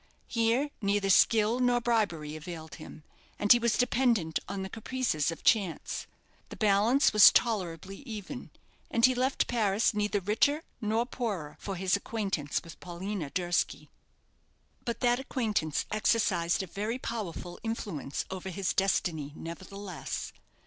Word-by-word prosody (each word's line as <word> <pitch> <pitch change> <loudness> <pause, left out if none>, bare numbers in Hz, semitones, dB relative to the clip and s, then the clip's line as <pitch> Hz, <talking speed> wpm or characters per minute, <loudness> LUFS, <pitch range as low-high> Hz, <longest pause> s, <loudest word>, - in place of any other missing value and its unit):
Here 235 +5 +1
neither 200 -1 +1
skill 220 +4 +4
nor 245 -1 +3
bribery 200 -11 0
availed 160 -1 -8
him, 155 - -11 0.3
and 205 - +2
he 240 - +9
was 235 -1 +1
dependent 235 -9 +2
on 195 -1 -3
the - - -4
caprices 225 - -1
of 165 - -6
chance. 195 -7 +1 0.4
The - - -8
balance 215 +7 +3
was 210 -1 +10
tolerably 195 -4 0
even, 235 0 -7 0.4
and 230 - +4
he 255 - +4
left 255 +2 +1
Paris 220 -2 +2
neither 210 0 0
richer 255 - +1 0.2
nor 220 +2 +1
poorer 205 - -4
for 195 - -5
his 185 +1 +1
acquaintance 200 -8 -2
with 165 - -12
Paulina 180 -2 -5
Durski. 175 +2 -1 1.0
But 235 -1 -3
that 245 0 +3
acquaintance 215 - -1
exercised 205 -5 +2
a - - -4
very 210 +7 -3
powerful 185 -8 -5
influence 205 -11 -4
over 190 0 -5
his 185 -4 -1
destiny, 160 -6 0
nevertheless. 185 +2 -6
205 Hz, 135 wpm, -30 LUFS, 175-230 Hz, 1.0 s, was